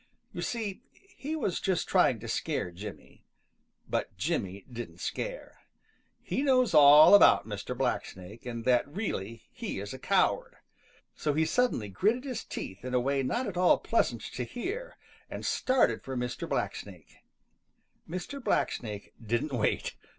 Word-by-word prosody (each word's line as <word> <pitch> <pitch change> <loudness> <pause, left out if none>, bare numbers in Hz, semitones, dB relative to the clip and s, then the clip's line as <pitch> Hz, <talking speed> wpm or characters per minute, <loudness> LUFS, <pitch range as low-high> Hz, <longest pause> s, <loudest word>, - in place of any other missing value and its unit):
You - - -5
see, 220 -5 -3 0.3
he 305 0 -4
was 200 - -1
just 185 -3 0
trying 180 - +3
to 120 - -7
scare 115 - -2
Jimmy. 100 +4 -10 0.6
But - - -2
Jimmy 95 +1 -2
didn't 120 -1 -8
scare. - - -5 0.6
He - - -1
knows 255 -6 +3
all 150 +3 +9
about 205 - +7
Mr. - - -5
Blacksnake 95 +5 -3
and 115 -1 -5
that 125 0 +3
really 115 - -4
he - - -5
is 100 +3 -6
a 130 - -8
coward. - - +1 0.6
So 150 - -1
he 160 +1 +3
suddenly 200 - +1
gritted 215 - +1
his 260 -3 -4
teeth 95 +3 -7
in 130 0 -3
a - - +4
way 135 +2 +1
not 240 - -1
at 195 -4 -5
all 180 0 +5
pleasant 120 - 0
to 125 - -4
hear 410 - -5 0.3
and - - -6
started 255 - +2
for 130 -1 -5
Mr. 125 0 -3
Blacksnake. - - -4 0.9
Mr. 185 - -5
Blacksnake 105 - -1
didn't 120 +6 -1
wait. 115 -4 -1
140 Hz, 150 wpm, -29 LUFS, -, 0.9 s, all